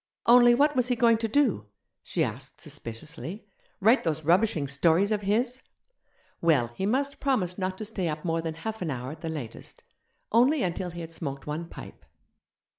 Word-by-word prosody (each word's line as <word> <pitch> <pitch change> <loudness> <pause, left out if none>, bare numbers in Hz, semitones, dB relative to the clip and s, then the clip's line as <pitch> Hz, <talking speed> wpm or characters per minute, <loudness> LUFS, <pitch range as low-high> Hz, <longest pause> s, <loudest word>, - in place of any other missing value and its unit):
Only, 240 0 +7
what 290 +3 +3
was 250 -1 +2
he 250 - +1
going 230 -1 +4
to 225 - -1
do? 220 - +1 0.3
she - - -1
asked - - -5
suspiciously; 155 - -7 0.3
write 225 +7 +4
those 160 -2 -2
rubbishing 170 -3 +3
stories 165 +8 +2
of 210 -1 +1
his? 240 +6 0 0.8
Well, 140 -8 +3
he 190 +9 -2
must 275 +5 0
promise 200 -10 0
not 185 0 -2
to 215 - -5
stay 200 -4 -3
up 155 0 -4
more 165 -1 0
than 160 -1 -4
half 220 +6 -5
an 175 - -2
hour 130 -1 -4
at 155 - -11
the 165 - -4
latest 145 -8 -7 0.5
only 255 +6 +4
until 180 0 -2
he 170 0 -7
had 165 0 -8
smoked 140 -4 -5
one 160 +3 -4
pipe. - - -11
185 Hz, 185 wpm, -27 LUFS, 160-230 Hz, 0.8 s, Only